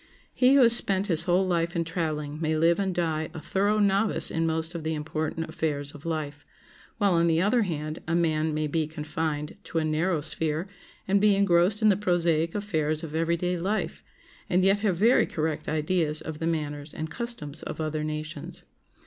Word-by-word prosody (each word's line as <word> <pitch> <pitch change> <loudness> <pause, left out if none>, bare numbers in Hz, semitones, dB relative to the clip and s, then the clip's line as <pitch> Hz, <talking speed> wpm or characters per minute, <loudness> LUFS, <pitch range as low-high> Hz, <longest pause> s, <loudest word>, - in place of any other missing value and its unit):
He 255 +2 +4
who 275 - +7
has 235 0 +8
spent 195 -4 +3
his 170 -4 0
whole 180 +2 +3
life 170 -1 0
in 170 - +1
traveling 155 -3 -3
may 160 -1 0
live 170 +3 +3
and 195 -1 0
die 160 -2 -1
a - - -4
thorough 200 +6 0
novice 205 +1 +2
in 165 0 0
most 160 +1 -2
of 170 -2 -5
the 160 0 -1
important 155 +1 -3
affairs 145 -3 -2
of 145 +2 -10
life, 150 -3 -4 0.5
while, 200 -3 +3
on 170 0 +3
the 165 -1 +3
other 210 +7 +3
hand, 155 -5 -3
a 165 - 0
man 160 -2 +1
may 155 0 -1
be 155 +1 -1
confined 155 0 -4
to - - -4
a 160 - +1
narrow 155 +1 0
sphere 155 +1 -2 0.4
and 195 +1 +3
be 210 -1 +5
engrossed 195 +2 +3
in 215 - +6
the 200 - +5
prosaic 170 -4 +1
affairs 160 -6 -1
of 155 -2 -6
every 165 +1 +1
day 180 +1 -1
life, 200 +5 -2 0.5
and 180 +1 +3
yet 195 +2 +4
have 200 -5 0
very 230 +7 +4
correct 155 -1 -2
ideas 155 0 0
of 155 -1 -6
the 165 - -1
manners 150 -2 -3
and 160 0 -5
customs 160 -9 -5
of - - -6
other 155 -1 -2
nations. 155 0 -5
165 Hz, 200 wpm, -27 LUFS, 155-185 Hz, 0.5 s, has